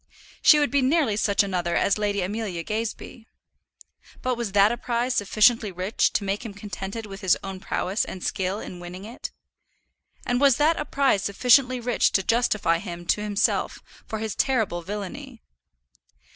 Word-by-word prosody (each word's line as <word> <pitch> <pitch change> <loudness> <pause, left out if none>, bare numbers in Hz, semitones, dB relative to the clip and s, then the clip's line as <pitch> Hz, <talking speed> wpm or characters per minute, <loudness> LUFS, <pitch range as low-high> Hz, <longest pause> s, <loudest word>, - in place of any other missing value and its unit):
She 305 - +7
would 290 -1 +1
be 280 0 +3
nearly 265 -4 +2
such 205 -1 +2
another 175 -3 -2
as 200 - +2
Lady 205 -2 0
Amelia 195 -3 -3
Gazebee. 225 +2 -5 1.0
But 255 - +1
was 235 -5 -4
that 205 +1 +5
a - - 0
prize 240 +1 -1
sufficiently 215 +1 +3
rich 185 +4 0
to 210 - 0
make 200 +2 -2
him 215 -4 -8
contented 200 +2 -6
with 195 -1 -9
his 190 -3 +3
own 195 -1 -6
prowess 190 +2 -1
and 185 - -7
skill 190 0 -2
in 180 - -8
winning 180 +2 -9
it? 235 +3 -7 1.0
And 245 +1 0
was 275 -4 +5
that 310 +3 +2
a 300 - -2
prize 275 -9 +2
sufficiently 250 +5 +3
rich 240 0 +1
to 190 - +2
justify 215 -7 +1
him 175 -2 -7
to 210 - +1
himself 210 -1 0 0.3
for 220 - -4
his 220 -1 -3
terrible 220 -10 0
villany? 215 - -7
210 Hz, 170 wpm, -25 LUFS, 195-245 Hz, 1.0 s, She